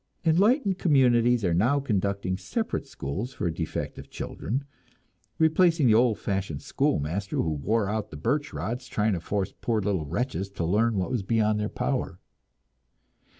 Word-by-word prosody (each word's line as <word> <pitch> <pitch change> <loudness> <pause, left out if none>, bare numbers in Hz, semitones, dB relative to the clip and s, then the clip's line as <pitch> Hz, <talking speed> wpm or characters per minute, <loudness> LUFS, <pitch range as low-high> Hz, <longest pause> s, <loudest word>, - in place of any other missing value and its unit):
Enlightened 195 - +3
communities 125 - +4
are 85 - +2
now 120 +12 +3
conducting 100 -6 -1
separate 225 - -3
schools 100 - -5
for 85 -5 -1
defective 80 -1 -5
children 130 +7 -4 0.7
replacing 160 -1 +4
the 115 - +6
old 115 -1 +4
fashioned 95 -8 -3
schoolmaster 85 +7 -1
who 80 - +1
wore 100 +9 0
out 105 0 -2
birch 145 +5 0
rods 120 +3 -4
trying 105 0 +1
to 90 - -1
force 100 +3 -2
poor 115 -2 +1
little 95 -7 -1
wretches 100 - -2
to 90 -4 -3
learn 105 +5 +2
what 95 - -1
was 125 -4 0
beyond 110 +1 +1
their 105 0 -1
power. 125 -10 -2
110 Hz, 150 wpm, -27 LUFS, 95-130 Hz, 0.7 s, the